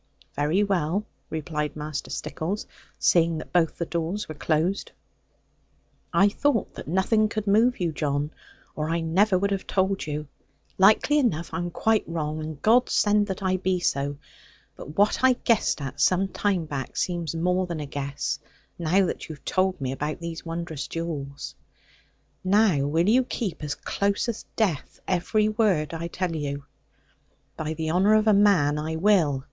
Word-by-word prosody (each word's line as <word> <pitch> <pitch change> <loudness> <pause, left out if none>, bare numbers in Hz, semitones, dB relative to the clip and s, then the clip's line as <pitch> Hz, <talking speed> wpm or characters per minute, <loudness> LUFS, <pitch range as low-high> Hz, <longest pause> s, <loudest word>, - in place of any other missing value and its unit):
'Very 150 +8 +2
well,' 195 0 0 0.2
replied 150 -1 -3
Master 150 -1 -5
Stickles, 190 +7 -3 0.3
seeing 165 -1 +3
that 155 - -8
both 170 -3 +2
the 170 - -2
doors 170 +5 -3
were 155 - -6
closed; 155 +6 0 1.2
'I 195 - +5
thought 245 +1 0
that - - -9
nothing 210 +6 +2
could 215 -1 -3
move 225 +5 +3
you, 175 -3 0
John; 145 -1 -1 0.4
or 155 0 -2
I 165 +1 +1
never 185 +5 +3
would 200 +2 0
have 195 -1 -2
told 190 -2 0
you. 150 0 -4 0.5
Likely 215 +9 +5
enough 170 - 0
I 165 - -1
am 175 0 -2
quite 220 +5 +1
wrong; 155 -2 -3
and 155 -2 -6
God 240 +3 +5
send 205 0 +3
that 190 0 -4
I 185 0 +2
be 185 0 0
so. 140 -4 -1 0.6
But 150 +3 -10
what 205 +1 +3
I 260 0 +7
guessed 230 -9 +1
at 135 - -5
some 190 +1 +3
time 190 -3 0
back 140 -4 -5
seems 170 -4 -1
more 180 +2 +1
than 170 -3 -4
a 150 - -4
guess, 140 0 -3 0.4
now 180 +4 +3
that - - -4
you 155 - -5
have 140 - -23
told 185 0 +1
me 130 -2 -2
about 150 +4 -3
these 170 -1 -6
wondrous 165 -4 -4
jewels. 145 -5 -5 0.9
Now 185 -7 +3
will 165 +5 +2
you 250 +5 +5
keep, 195 -10 -4
as 145 -1 -2
close 200 +2 -1
as 230 -2 -4
death, 190 - -1
every 200 +4 +1
word 205 -8 +1
I 165 +1 -3
tell 175 -1 -3
you?' 140 -2 -4 0.9
'By 155 0 -3
the 160 0 -2
honour 195 +5 +4
of 215 0 +3
a 215 - +5
man, 180 -8 +4
I 160 +1 -3
will. 165 -6 +3
170 Hz, 170 wpm, -25 LUFS, 155-200 Hz, 1.2 s, I